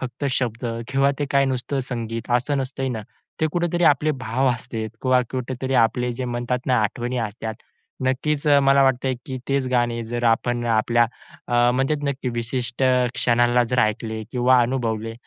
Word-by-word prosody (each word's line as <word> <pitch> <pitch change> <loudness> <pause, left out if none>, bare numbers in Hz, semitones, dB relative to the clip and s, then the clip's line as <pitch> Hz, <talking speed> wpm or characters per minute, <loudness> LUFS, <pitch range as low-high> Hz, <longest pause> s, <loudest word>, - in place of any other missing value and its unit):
फक्त 130 +2 -5
शब्द 125 -2 -2 0.2
किंवा 135 +1 +3
ते 145 - 0
काय 140 0 +4
नुसतं 135 +1 -2
संगीत 115 -1 -4
असं 140 +3 -1
नसतंय 135 0 -2
ना? 110 -4 -4 0.4
ते 160 - +3
कुठेतरी 175 0 0
आपले 150 0 +4
भाव 130 +3 +1
असतात 115 -2 -4
किंवा 130 -1 +4
कुठेतरी 130 +1 -3
आपले 125 +1 -3
जे 130 +2 -4
म्हणतात 120 +1 -2
ना, 125 -1 +3
आठवणी 120 +4 -2
असतात. 110 +1 -6 0.5
नक्कीच, 140 +3 0 0.2
मला 135 0 +5
वाटतंय, 130 0 +2
की 130 -1 -4
तेच 135 -1 +1
गाणे 120 -2 0
जर 120 +1 -3
आपण 120 +1 +1
आपल्या 120 +1 +3 0.4
अ, 120 0 +4
म्हणजे 135 +4 +1
नक्की 140 -2 -2
विशिष्ट 120 +2 -3 0.3
क्षणाला 120 0 +3
जर 125 - +1
ऐकले 110 0 -2
किंवा 125 0 +4
अनुभवले 115 -3 -2
125 Hz, 160 wpm, -23 LUFS, 120-135 Hz, 0.5 s, मला